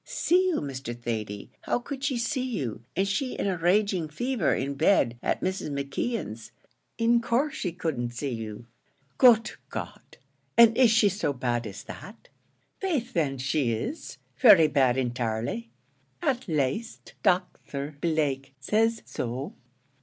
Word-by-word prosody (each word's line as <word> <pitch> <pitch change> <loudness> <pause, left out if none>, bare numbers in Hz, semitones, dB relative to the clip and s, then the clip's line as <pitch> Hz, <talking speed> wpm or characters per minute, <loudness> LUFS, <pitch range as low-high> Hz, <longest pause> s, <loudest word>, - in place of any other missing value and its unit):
"See 365 +2 +2
you, 360 - 0
Mr. 130 -4 -5
Thady! 110 -4 -4
How - - 0
could 270 +2 -7
she 275 -3 0
see 255 +2 -1
you, 115 -3 -4
an' 190 +3 +2
she 205 +7 -1
in - - -2
a 195 -2 +1
raging 180 -1 +1
fever 235 - 0
in 140 +2 -2
bed 135 -6 +2
at - - -1
Mrs. 185 -4 -2
McKeon's? 140 - -3 0.5
in 235 +1 +3
course 260 +6 +1
she 195 - -3
couldn't 160 -8 -2
see 125 +3 -4
you." 110 0 -6 0.5
"Good 235 -3 +6 0.2
God! - - -8 0.4
and 230 -1 +8
is 250 -1 +6
she 220 -1 +5
so 195 -7 0
bad 120 -3 -1
as 100 -1 -8
that?" 205 +4 -11 0.5
"Faith 285 - -1
then, 140 - 0
she 135 -2 0
is, 245 - -5 0.2
very 195 -10 +8
bad 130 -4 +3
intirely; 115 -2 -2 0.5
at 250 - -1
laste, 155 - -2
Docther 165 -6 -1
Blake 140 -5 -1
says 225 +10 +1
so." 125 +3 -4
160 Hz, 145 wpm, -27 LUFS, -, 0.5 s, and